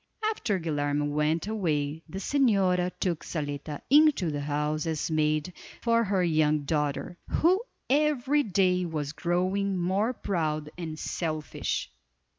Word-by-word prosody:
After 210 - -1
Guilerme 145 -3 -1
went 150 +3 +1
away 160 -8 -1
the 190 - -6
señora 195 -7 +2
took 175 -4 -1
Zaletta 145 -1 -4
into 290 - +5
the 145 -1 -3
house 150 +2 -1
as 160 0 -2
maid 155 +2 +1 0.3
for 230 0 +2
her 195 -2 +1
young 155 -3 +2
daughter, 150 +4 -2
who 365 +5 +3 0.3
every 295 0 +2
day 185 -5 +2
was 155 -4 -3
growing 185 +3 0
more 190 +6 +1
proud 155 -9 -2
and 160 -3 -5
selfish. 155 - -3
170 Hz, 125 wpm, -28 LUFS, 150-200 Hz, 0.3 s, into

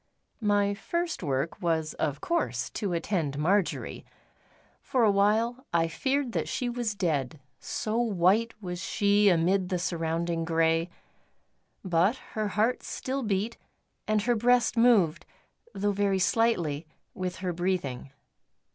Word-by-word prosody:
My 205 -1 +2
first 340 +11 -3
work 140 +7 -2
was 160 -3 0
of 145 -1 -2
course 340 0 -1
to 205 -4 -3
attend 165 -4 -1
Marjory. 185 +5 0 0.8
For 255 -3 +1
a 215 - +5
while 220 +5 +2
I 165 -1 +2
feared 265 - -1
that - - -2
she 245 - -2
was 240 -3 -2
dead, 155 -7 -1 0.2
so 215 +1 -3
white 215 0 +2
was 180 -3 -5
she 205 0 +3
amid 180 +2 +2
the 185 - 0
surrounding 165 -1 -1
grey. 165 +1 +1 1.0
But 180 +5 +3 0.2
her 215 -1 -1
heart 220 +5 +1
still 270 +1 -4
beat, 210 0 -1 0.5
and 215 -1 +1
her 240 +2 +2
breast 240 +2 +3
moved, 225 -9 +3 0.5
though 205 +1 0
very 200 -1 +1
slightly, 175 -7 +1 0.3
with 180 -1 -4
her 185 -2 -3
breathing. 170 -8 -2
195 Hz, 130 wpm, -28 LUFS, 165-225 Hz, 1.0 s, a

